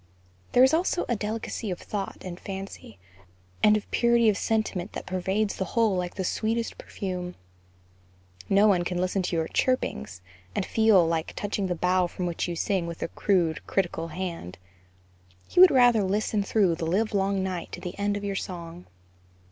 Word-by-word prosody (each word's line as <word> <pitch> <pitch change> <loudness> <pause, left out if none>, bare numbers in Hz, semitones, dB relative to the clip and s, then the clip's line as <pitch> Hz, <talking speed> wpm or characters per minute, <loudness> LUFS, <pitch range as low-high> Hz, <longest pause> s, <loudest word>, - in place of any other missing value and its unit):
There 250 - +7
is 265 - +5
also 350 +2 +1
a 240 - +1
delicacy 220 0 -4
of 180 - -2
thought 200 -2 -5
and 180 -1 -6
fancy, 195 - -8 0.6
and 215 0 +6
of 210 - -8
purity 235 -1 +4
of 210 - +2
sentiment 215 -3 -1
that - - -6
pervades 190 +3 -1
the - - -1
whole 225 -4 +4
like 180 -1 -3
the 190 - -2
sweetest 225 +5 -1
perfume. 180 -3 -5 1.1
No 200 +2 +5
one 185 -4 +3
can 180 0 -3
listen 185 +2 0
to 180 -1 -2
your 160 -1 0
"Chirpings" 90 - -1 0.3
and - - 0
feel 220 -6 +4
like 165 0 -1
touching 205 -1 -2
the 180 - -1
bough 180 +1 +2
from 180 +1 -5
which 175 0 -2
you 175 - -3
sing 185 0 0
with 170 -1 -5
a - - -4 0.2
rude, 175 -6 +3
critical 170 -3 -1
hand; 165 - -5 0.9
he - - 0
would 370 0 +10
rather 245 -5 +5
listen 205 +2 0
through 200 -3 +2
the 165 0 -3
live 210 +6 0
long 195 -1 +1
night 185 -2 -4
to - - -5
the 180 - -6
end 205 0 0
of 205 - -7
your 200 -1 -2
song. 175 -2 -6
190 Hz, 180 wpm, -26 LUFS, 175-215 Hz, 1.1 s, would